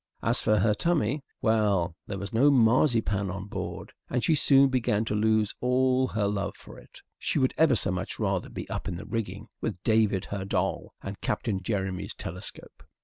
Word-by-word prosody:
As - - +2
for 110 - +3
her 105 0 +3
tummy 150 -1 0 0.2
well, 100 -7 +2
there 100 -3 -4
was 100 +4 -6
no 130 +6 +5
marzipan 115 -5 +3
on 95 +1 -5
board, 100 - -6 0.2
and 125 -1 -1
she 165 - +4
soon 140 -2 +5
began 115 -4 +1
to 110 - -2
lose 110 0 +2
all 130 +1 +2
her 105 -4 -1
love 100 0 -2
for - - -13
it. - - -16 0.2
She - - -1
would 130 -1 +2
ever 155 -5 +4
so 100 - 0
much 90 +1 -3
rather - - -1
be - - -7
up - - -4
in - - -3
the 85 - -7
rigging 105 -2 -4 0.2
with 100 -6 -3
David 110 -4 +2
her 100 -1 -4
doll 95 - -2
and 100 +1 -7
Captain 100 -4 -1
Jeremy's 95 -2 -3
telescope. 90 +4 -7
110 Hz, 190 wpm, -27 LUFS, 100-125 Hz, 0.2 s, no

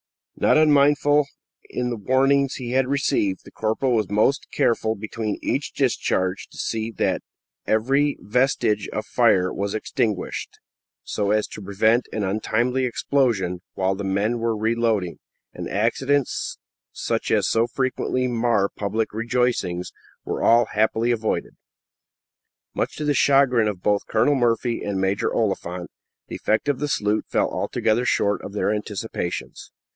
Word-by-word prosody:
Not - - +3
unmindful 145 -1 +4
of 150 - +1 0.4
the 125 -1 -2
warning 135 +5 +2
he 125 -3 -5
had 130 0 +2
received, 115 -8 0
the - - -13
corporal 110 +4 0
was 110 -4 +1
most 110 +7 +2
careful 110 -1 +1
between 110 0 -4
each 135 - -1
discharge 95 -8 0
to - - -16
see 110 0 -2
that - - 0 0.5
every 135 +7 +2
vestige 105 -3 +1
of - - -3
fire 90 0 +3
was 100 +1 -2
extinguished, 110 -2 -2 0.5
so 100 -1 -2
as 105 +1 +2
to - - -8
prevent 110 +5 +2
an 110 - -2
untimely 120 +6 0
explosion 115 -9 0
while 95 0 +1
the 100 +1 -5
men 100 +5 0
were 115 -1 0
reloading; 110 -4 0 0.3
and - - -6
accidents, 130 +6 0 0.3
such - - -2
as - - +2
so 115 +1 +2
frequently 130 0 -1
mar 115 -4 +1
public 110 +2 -2
rejoicings, 115 -6 -1 0.3
were - - -3
all 120 +1 +5
happily 110 +2 +2
avoided. 110 -2 -1 1.2
Much - - -2
to 150 - -4
the 145 - +2
chagrin 135 -5 +4
of 95 -4 -4
both 105 -1 +1
Colonel 110 +6 +3
Murphy 120 -2 0
and 100 -2 -2
Major 95 +1 0
Oliphant, 90 -5 -2 0.4
the - - -6
effect 110 +6 0
of 145 -3 +1
the 150 - -1
salute 105 -6 0
fell - - +1
altogether 115 +3 0
short 100 -4 +1
of 100 - -7
their 105 0 0
anticipations. 105 -3 -5
115 Hz, 145 wpm, -23 LUFS, 105-125 Hz, 1.2 s, all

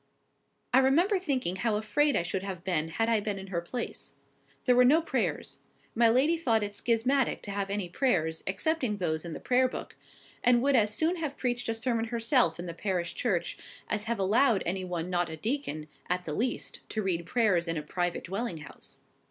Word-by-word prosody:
I 260 - +7
remember 340 +10 +3
thinking 260 - -1
how 225 +1 0
afraid 235 +8 +2
I - - +2
should 185 +2 -2
have 190 -3 -6
been 170 -5 0
had 225 +7 -1
I 230 -2 +3
been 205 -1 -3
in 190 - -7
her 170 - 0
place. 240 +8 -3 0.5
There 250 - +5
were 250 - +7
no 285 +6 +6
prayers. 330 - -2 0.3
My 230 0 +4
lady 275 +8 +3
thought 230 -9 +2
it 205 0 -3
schismatic 245 +5 +1
to 205 - -5
have 200 0 -2
any 200 -2 -2
prayers 170 - 0
excepting 245 +2 0
those 160 -3 -1
in 170 - -5
the - - -6
Prayer 255 +1 +3
book; - - -7 0.5
and 240 0 +4
would 280 0 +3
as 210 -3 +4
soon 325 +10 +2
have 305 -4 -4
preached 245 -2 -1
a 225 - 0
sermon 230 0 0
herself 230 - +2
in 175 - -6
the 170 - -5
parish 180 -1 -2
church, 180 -8 -1 0.3
as 210 -1 0
have 235 0 -1
allowed 205 +2 +3
any 185 +2 -1
one 180 -1 -3
not 175 -1 +1
a 160 - -6
deacon 210 - -3 0.2
at 180 0 0
the 155 - -4
least 245 +10 -2
to 215 - -2
read 170 -3 -1
prayers 200 -8 +2
in 165 0 -1
a 150 - -3
private 175 +3 -2
dwelling 195 0 -3
house. 150 -2 -10
215 Hz, 205 wpm, -29 LUFS, 180-250 Hz, 0.5 s, I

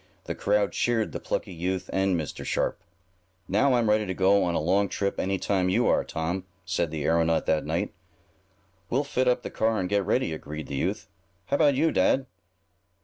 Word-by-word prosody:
The - - -4
crowd 105 0 +1
cheered 115 -3 0
the - - -5
plucky 95 - -3
youth 90 +2 -2
and 95 -2 +2
Mr. 75 - -5
Sharp. - - -1 0.7
"Now 125 +7 +3
I'm 120 -2 +2
ready 105 -1 +2
to 95 - -3
go 100 +1 +4
on 85 -1 0
a - - +2
long 95 +5 +2
trip 100 -1 -2
any 95 +1 0
time 95 -1 0
you - - +2
are, - - +3
Tom," 85 +4 -3 0.2
said 90 -3 0
the 75 -2 -4
aeronaut 80 0 +2
that 80 -1 +1
night. - - -1 1.0
"We'll 135 +4 +1
fit 130 -2 0
up 125 0 +2
the - - -6
car 110 0 +1
and 90 - -1
get 100 +1 +1
ready," 80 - 0
agreed 75 -1 -6
the 70 - -5
'youth. 70 - -2 0.4
"How 140 - 0
about 145 -3 +4
you, 160 +4 +2
dad?" 130 +8 +2
95 Hz, 200 wpm, -26 LUFS, 85-110 Hz, 1.0 s, go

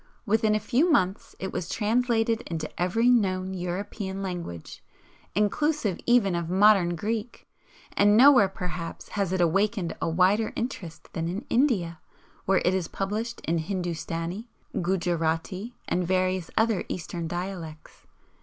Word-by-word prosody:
Within 220 0 +2
a - - +2
few 260 - +2
months 190 -9 +1
it 190 - -5
was 170 - -3
translated 225 0 +1
into 160 -2 -3
every 225 +7 +2
known 190 -6 +2
European 190 +2 -4
language, 175 - -6 0.5
inclusive 210 - +1
even 240 -6 +4
of 170 -1 -2
modern 190 -2 +5
Greek, 220 +6 -4 0.5
and 205 +1 +5
nowhere 255 -5 +7
perhaps 180 -3 -6
has 200 -4 -1
it 185 - 0
awakened 195 +2 +1
a - - 0
wider 190 +6 +2
interest 200 - -6
than 165 -1 -2
in 195 +7 -4
India, 200 - +2 0.5
where 190 0 +2
it 180 - +3
is 185 -3 -1
published 215 +4 -3
in 165 +1 0
Hindustani, 175 +2 -3 0.3
Gujarati, 175 +4 -1
and 180 - 0
various 185 -1 0
other 220 -3 +2
Eastern 170 -1 -4
dialects. 175 -3 -7
190 Hz, 135 wpm, -26 LUFS, 175-220 Hz, 0.5 s, nowhere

